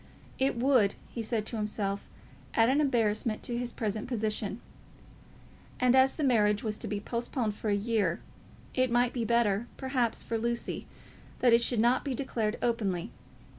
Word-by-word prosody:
It 265 -2 +1
would, 245 -5 +3 0.2
he 235 - -4
said 220 -1 -1
to 230 - -3
himself, 205 -2 -3 0.5
add 225 +1 +5
an 280 +3 +3
embarrassment 225 -5 +1
to 240 - -2
his 240 0 -2
present 215 0 -3
position. 215 -2 -1 1.2
And 250 0 +4
as 265 0 +5
the 310 - -2
marriage 210 -6 +3
was 215 -1 -3
to - - -4
be 205 - -2
postponed 235 0 -2
for 210 +1 -4
a 205 - +3
year, 205 -5 0 0.5
it 255 0 +2
might 240 +1 +2
be 235 -3 -1
better, 235 -1 +2
perhaps, 260 -4 -1
for 230 - -2
Lucy 235 +1 -2 0.5
that 245 -2 +4
it 235 - +6
should 235 -1 +2
not 240 +3 +3
be 275 -3 -2
declared 230 -4 -2
openly. 205 -8 -1
230 Hz, 170 wpm, -30 LUFS, 210-245 Hz, 1.2 s, it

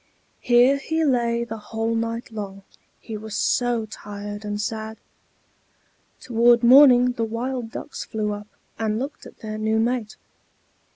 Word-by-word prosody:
Here 245 +3 +4
he 320 +3 -1
lay 235 -3 +1
the 225 -1 -6
whole 225 +2 -3
night 230 +1 -3
long, 200 -2 -7 0.4
he 225 - -8
was 215 0 -7
so 240 0 +1
tired 205 0 -8
and 205 0 -4
sad. 220 +1 -4 1.2
Toward 240 0 +3
morning 250 -1 +7
the 235 -2 -3
wild 235 +2 -3
ducks 285 - -7
flew 210 -2 -3
up, 205 0 -8 0.3
and 215 -1 0
looked 275 +5 -6
at - - -17
their 215 -1 -5
new 220 +1 +1
mate. 230 -1 -1
225 Hz, 140 wpm, -23 LUFS, 215-245 Hz, 1.2 s, morning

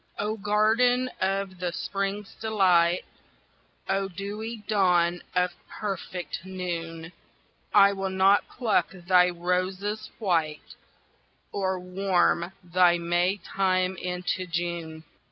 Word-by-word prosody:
Oh, 210 +1 -1
garden 225 +5 +2
of 190 -1 -1
the 180 -1 -1
Spring's 195 +4 -3
delight! 185 -5 +2 0.8
Oh, 195 0 0
dewy 210 +4 -6
dawn 175 -4 +2
of 180 0 +2 0.2
perfect 185 -5 -5
noon! 170 -3 -5 0.6
I 200 -1 +6
will 195 -1 -2
not 190 +2 +4
pluck 225 -5 +1
thy 180 0 +4
roses 185 +4 -2
white 165 -7 -1 0.8
Or 190 -2 -1
warm 180 -1 +1
thy 175 0 +4
May 175 +3 +1
time 185 0 0
into 180 +1 -3
June. 165 -2 -3
185 Hz, 100 wpm, -27 LUFS, 175-200 Hz, 0.8 s, I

